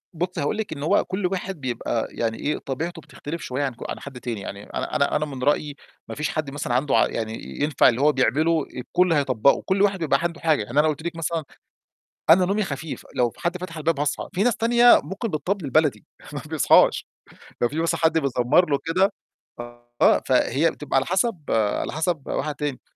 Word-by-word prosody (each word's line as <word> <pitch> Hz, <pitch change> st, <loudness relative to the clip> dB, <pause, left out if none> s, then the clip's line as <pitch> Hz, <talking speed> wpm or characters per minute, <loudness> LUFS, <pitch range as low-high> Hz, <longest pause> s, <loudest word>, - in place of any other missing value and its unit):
بُصّي 180 Hz, 0 st, -3 dB
هاقول 145 Hz, +9 st, -1 dB
لِك 220 Hz, -7 st, -3 dB
إن 140 Hz, -, -7 dB
هو 155 Hz, -, +2 dB
كلّ 190 Hz, +1 st, -3 dB
واحد 185 Hz, -3 st, -3 dB
بيبقى 120 Hz, -2 st, -2 dB
يعني 115 Hz, -1 st, -2 dB
إيه، 150 Hz, -, -1 dB
طبيعته 165 Hz, +5 st, -5 dB
بتختلف 160 Hz, +3 st, -8 dB
شوية 130 Hz, +1 st, -3 dB
عن 135 Hz, -3 st, -2 dB
ك -, -, -9 dB
عن -, -, -4 dB
حد 135 Hz, -3 st, -9 dB
تاني، 115 Hz, -5 st, -5 dB
يعني 100 Hz, +1 st, -7 dB
أنا -, -, -3 dB
أنا 140 Hz, -, +1 dB
أنا 150 Hz, -, +1 dB
من 135 Hz, -4 st, -7 dB
رأيي 145 Hz, +1 st, +1 dB, 0.3 s
ما -, -, -6 dB
فيش 150 Hz, -, -2 dB
حد 155 Hz, -3 st, -3 dB
مثلًا 140 Hz, -4 st, -3 dB
عنده 135 Hz, +3 st, +1 dB
عق -, -, +2 dB
يعني 110 Hz, -1 st, -3 dB, 0.3 s
ينفع 145 Hz, -3 st, +4 dB
اللي 125 Hz, +2 st, -1 dB
هو 150 Hz, +1 st, +5 dB
بيعمله 155 Hz, +4 st, +1 dB
الكلّ 180 Hz, +7 st, +1 dB
هيطبّقه، 140 Hz, -4 st, +2 dB
كلّ 190 Hz, +1 st, +1 dB
واحد 200 Hz, -1 st, +2 dB
بيبقى 145 Hz, -4 st, +1 dB
عنده 170 Hz, -1 st, -2 dB
حاجة، 155 Hz, -8 st, +2 dB
يعني 120 Hz, +8 st, 0 dB
أنا 155 Hz, -, +4 dB
قُلت 155 Hz, 0 st, -2 dB
لِك 170 Hz, 0 st, -4 dB
مثلًا 165 Hz, 0 st, -2 dB, 0.9 s
أنا 180 Hz, +3 st, +7 dB
نومي 200 Hz, +3 st, 0 dB
خفيف 155 Hz, -2 st, -6 dB
لو 125 Hz, -2 st, +2 dB
في -, -, -20 dB
حد 175 Hz, +1 st, -1 dB
فتح 180 Hz, -2 st, -7 dB
الباب 155 Hz, -1 st, 0 dB
هاصحى، 145 Hz, 0 st, -2 dB
في 185 Hz, -, +1 dB
ناس 245 Hz, -1 st, +2 dB
تانية 240 Hz, +1 st, +6 dB
ممكن 190 Hz, -, -4 dB
بالطبل 180 Hz, 0 st, -2 dB
البلدي 140 Hz, -, +1 dB, 0.3 s
ما -, -, -4 dB
بيصحاش، -, -, +4 dB, 0.6 s
لو 120 Hz, -, +3 dB
في 150 Hz, -, -5 dB
مثلًا 165 Hz, -, 0 dB
حد 160 Hz, 0 st, +3 dB
بيزمّر 140 Hz, +4 st, +2 dB
له 140 Hz, -, +2 dB
كده 185 Hz, +5 st, +2 dB, 0.9 s
آه، -, -, +5 dB
فهي 135 Hz, +4 st, +2 dB
بتبقى 150 Hz, -2 st, -4 dB
على 135 Hz, -, +2 dB
حسب 185 Hz, -1 st, 0 dB
على 110 Hz, -2 st, 0 dB
حسب 160 Hz, -1 st, -1 dB
واحد 150 Hz, -1 st, -2 dB
تاني، 145 Hz, -3 st, -4 dB
150 Hz, 210 wpm, -23 LUFS, 135-175 Hz, 0.9 s, أنا